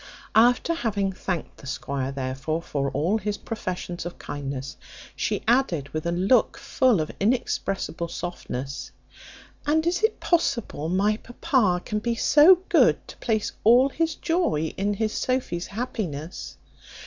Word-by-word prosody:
After 245 Hz, +8 st, +4 dB
having 205 Hz, -10 st, -1 dB
thanked 180 Hz, -3 st, -4 dB
the 140 Hz, -, -12 dB
squire, 135 Hz, 0 st, -3 dB
therefore, 135 Hz, +4 st, -3 dB
for 140 Hz, -3 st, -1 dB
all 165 Hz, +11 st, 0 dB
his 205 Hz, 0 st, -2 dB
professions 180 Hz, -5 st, -5 dB
of 175 Hz, +1 st, -7 dB
kindness, 135 Hz, -2 st, -5 dB, 0.4 s
she -, -, -1 dB
added, 205 Hz, -, +2 dB
with 155 Hz, +2 st, -3 dB
a -, -, +1 dB
look 190 Hz, +8 st, +3 dB
full 255 Hz, -8 st, +2 dB
of 155 Hz, -, -3 dB
inexpressible 195 Hz, -6 st, -1 dB
softness, 140 Hz, -6 st, -5 dB, 0.8 s
"And 315 Hz, +2 st, +2 dB
is 350 Hz, +3 st, +1 dB
it 440 Hz, 0 st, +1 dB
possible 255 Hz, -, 0 dB
my 200 Hz, +4 st, +2 dB
papa 235 Hz, -, 0 dB
can 210 Hz, -, -1 dB
be 235 Hz, +2 st, -1 dB
so 330 Hz, +9 st, +6 dB
good -, -, +4 dB
to -, -, -10 dB
place 220 Hz, -3 st, -1 dB
all 245 Hz, +5 st, +6 dB
his 325 Hz, +2 st, -1 dB
joy 325 Hz, -, 0 dB
in 205 Hz, +1 st, 0 dB
his 215 Hz, +1 st, -1 dB
Sophy's 255 Hz, -9 st, -1 dB
happiness?" 195 Hz, -, -5 dB
200 Hz, 140 wpm, -25 LUFS, 160-250 Hz, 0.8 s, so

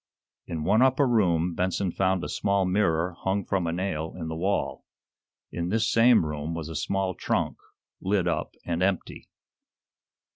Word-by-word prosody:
In 80 Hz, -2 st, -4 dB
one 110 Hz, +8 st, +3 dB
upper 130 Hz, +1 st, +4 dB
room 90 Hz, -7 st, +2 dB
Benson 90 Hz, +1 st, -1 dB
found 95 Hz, -1 st, +1 dB
a -, -, -3 dB
small 100 Hz, -1 st, +1 dB
mirror 90 Hz, -3 st, +1 dB
hung 95 Hz, 0 st, -1 dB
from 95 Hz, -3 st, 0 dB
a -, -, 0 dB
nail 85 Hz, -3 st, -3 dB
in 80 Hz, -2 st, -5 dB
the 80 Hz, -, -4 dB
wall. 95 Hz, +5 st, -1 dB, 0.7 s
In 85 Hz, 0 st, -3 dB
this 115 Hz, +3 st, +1 dB
same 115 Hz, -5 st, +5 dB
room 75 Hz, +1 st, -4 dB
was 80 Hz, -1 st, -5 dB
a 80 Hz, -, -6 dB
small 95 Hz, +4 st, -1 dB
trunk, -, -, -1 dB, 0.4 s
lid 95 Hz, -2 st, +1 dB
up 85 Hz, -, -2 dB
and 85 Hz, 0 st, -2 dB
empty. 95 Hz, -1 st, -1 dB
90 Hz, 160 wpm, -26 LUFS, 85-100 Hz, 0.7 s, same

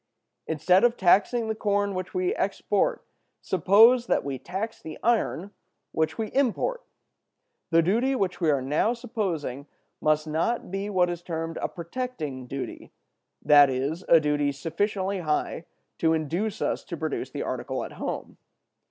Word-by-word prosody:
"Instead 180 Hz, +5 st, +3 dB
of 240 Hz, 0 st, +3 dB
taxing 205 Hz, +5 st, +3 dB
the 220 Hz, -, 0 dB
corn 205 Hz, -2 st, 0 dB
which 185 Hz, -1 st, -4 dB
we 370 Hz, +2 st, 0 dB
export, -, -, 0 dB, 0.3 s
suppose 220 Hz, +7 st, +5 dB
that -, -, +1 dB
we 135 Hz, -2 st, -4 dB
tax 200 Hz, -, -5 dB
the 155 Hz, -1 st, -8 dB
iron 215 Hz, -4 st, +1 dB, 0.4 s
which 160 Hz, 0 st, -1 dB
we 220 Hz, -2 st, -2 dB
import. 280 Hz, -, 0 dB, 0.9 s
The 165 Hz, -1 st, +4 dB
duty 235 Hz, +10 st, +2 dB
which 190 Hz, -6 st, -1 dB
we 165 Hz, -, +3 dB
are 140 Hz, -3 st, +2 dB
now 150 Hz, -, +1 dB
supposing 180 Hz, -, -4 dB, 0.3 s
must 155 Hz, 0 st, +2 dB
not 165 Hz, +7 st, -1 dB
be 195 Hz, +1 st, -3 dB
what 180 Hz, -3 st, +2 dB
is 175 Hz, -1 st, -5 dB
termed 165 Hz, -2 st, -4 dB
a -, -, 0 dB
protecting 170 Hz, -, -5 dB
duty, 135 Hz, +1 st, -6 dB, 0.5 s
that 145 Hz, -1 st, +7 dB
is, 140 Hz, +7 st, -2 dB
a 165 Hz, -, +8 dB
duty 145 Hz, -1 st, +1 dB
sufficiently 190 Hz, +7 st, -2 dB
high 160 Hz, 0 st, -2 dB, 0.3 s
to 160 Hz, -1 st, +3 dB
induce 175 Hz, +8 st, -2 dB
us -, -, -1 dB
to -, -, -6 dB
produce -, -, -3 dB
the -, -, -4 dB
article -, -, -3 dB
at -, -, -7 dB
home. -, -, -5 dB
180 Hz, 150 wpm, -26 LUFS, 155-220 Hz, 0.9 s, a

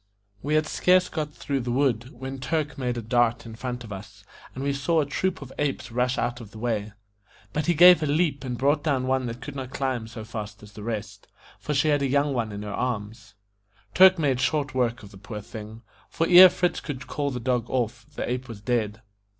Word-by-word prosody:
We 150 Hz, +3 st, 0 dB
had 155 Hz, 0 st, +3 dB
scarce 180 Hz, +3 st, +3 dB
got 150 Hz, -2 st, -3 dB
through 140 Hz, -1 st, -3 dB
the 120 Hz, -1 st, -4 dB
wood, 125 Hz, -2 st, +1 dB
when 130 Hz, +1 st, -7 dB
Turk 150 Hz, +1 st, -2 dB
made 125 Hz, -2 st, -2 dB
a 120 Hz, -, -4 dB
dart 120 Hz, +1 st, +1 dB
in 115 Hz, -, -8 dB
front 125 Hz, +1 st, -5 dB
of 105 Hz, -3 st, -8 dB
us, 100 Hz, +1 st, -11 dB, 0.3 s
and 130 Hz, -, -4 dB
we 140 Hz, 0 st, 0 dB
saw 160 Hz, +4 st, +1 dB
a 150 Hz, -, +2 dB
troop 170 Hz, +3 st, -2 dB
of 130 Hz, -, -12 dB
apes 135 Hz, -4 st, -2 dB
rush 125 Hz, +2 st, 0 dB
out 120 Hz, +1 st, -2 dB
of 110 Hz, -, -10 dB
the 110 Hz, -, -13 dB
way. 110 Hz, -3 st, -2 dB, 0.6 s
But 150 Hz, +2 st, -1 dB
he 175 Hz, -, +3 dB
gave 175 Hz, +1 st, +8 dB
a 155 Hz, -, 0 dB
leap 145 Hz, -2 st, +1 dB
and 125 Hz, -2 st, -4 dB
brought 145 Hz, +3 st, +2 dB
down 135 Hz, -5 st, +1 dB
one 130 Hz, -1 st, 0 dB
that 115 Hz, +1 st, -6 dB
could 135 Hz, +4 st, -7 dB
not 130 Hz, -2 st, -5 dB
climb 130 Hz, -4 st, -2 dB
so 110 Hz, -1 st, -8 dB
fast 110 Hz, -1 st, -7 dB
as 105 Hz, -, -13 dB
the 105 Hz, -, -10 dB
rest, 110 Hz, -2 st, -5 dB, 0.3 s
for 150 Hz, -, -3 dB
she 140 Hz, +3 st, +3 dB
had 145 Hz, -1 st, +2 dB
a 140 Hz, -, +1 dB
young 140 Hz, +1 st, +2 dB
one 115 Hz, -4 st, -1 dB
in 100 Hz, 0 st, -6 dB
her 105 Hz, -1 st, -5 dB
arms. 110 Hz, -3 st, -4 dB, 0.6 s
Turk 190 Hz, 0 st, +7 dB
made 140 Hz, -6 st, +1 dB
short 145 Hz, -1 st, 0 dB
work 120 Hz, -3 st, 0 dB
of 100 Hz, -, -12 dB
the 100 Hz, -, -13 dB
poor 105 Hz, +2 st, -7 dB
thing, 110 Hz, +2 st, -9 dB, 0.3 s
for 165 Hz, -, 0 dB
ere 180 Hz, +1 st, +10 dB
Fritz 180 Hz, 0 st, 0 dB
could 130 Hz, -4 st, -6 dB
call 145 Hz, -1 st, -2 dB
the 125 Hz, -2 st, -4 dB
dog 125 Hz, -1 st, -1 dB
off, 120 Hz, -2 st, -2 dB
the -, -, -3 dB
ape 125 Hz, +1 st, -3 dB
was 115 Hz, -3 st, -8 dB
dead. 110 Hz, -1 st, -1 dB
125 Hz, 230 wpm, -25 LUFS, 115-145 Hz, 0.6 s, ere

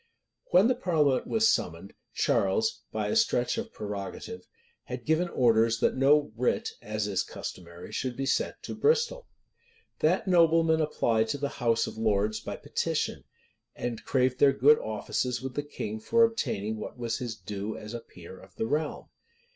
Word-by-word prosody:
When 185 Hz, +5 st, +6 dB
the 255 Hz, -, +3 dB
parliament 160 Hz, -, +1 dB
was 225 Hz, 0 st, +3 dB
summoned, -, -, -3 dB, 0.2 s
Charles, 450 Hz, -, +1 dB
by -, -, -2 dB
a -, -, 0 dB
stretch 220 Hz, -, +2 dB
of 230 Hz, 0 st, -6 dB
prerogative, 105 Hz, -, -6 dB, 0.4 s
had -, -, -6 dB
given 160 Hz, +3 st, +2 dB
orders 115 Hz, -4 st, +3 dB
that -, -, +2 dB
no 145 Hz, +1 st, +4 dB
writ, 125 Hz, +2 st, 0 dB
as 110 Hz, 0 st, -3 dB
is 100 Hz, -2 st, 0 dB
customary, 85 Hz, -1 st, -8 dB
should 125 Hz, -2 st, -3 dB
be 135 Hz, -, -2 dB
sent -, -, 0 dB
to -, -, -5 dB
Bristol.[*] 475 Hz, +2 st, +1 dB, 0.7 s
That 185 Hz, +7 st, +2 dB
nobleman 165 Hz, -2 st, +4 dB
applied 115 Hz, -7 st, +1 dB
to 125 Hz, -, -2 dB
the 140 Hz, 0 st, -2 dB
house 115 Hz, -4 st, +1 dB
of -, -, -7 dB
lords 105 Hz, -1 st, +1 dB
by -, -, -6 dB
petition; -, -, -2 dB, 0.5 s
and 120 Hz, -2 st, -4 dB
craved 130 Hz, -1 st, +1 dB
their 140 Hz, -1 st, +6 dB
good 145 Hz, +3 st, +5 dB
offices 120 Hz, +3 st, -2 dB
with 130 Hz, +1 st, -6 dB
the 145 Hz, -, -1 dB
king 110 Hz, -7 st, -5 dB
for 230 Hz, -, +3 dB
obtaining 115 Hz, -, 0 dB
what 105 Hz, -, -7 dB
was 120 Hz, 0 st, -2 dB
his 120 Hz, -4 st, -4 dB
due 105 Hz, 0 st, -5 dB
as 105 Hz, +2 st, -8 dB
a 120 Hz, -, -4 dB
peer 95 Hz, -4 st, -13 dB
of 95 Hz, -1 st, -17 dB
the -, -, -2 dB
realm. 150 Hz, +6 st, -2 dB
130 Hz, 170 wpm, -28 LUFS, 110-160 Hz, 0.7 s, When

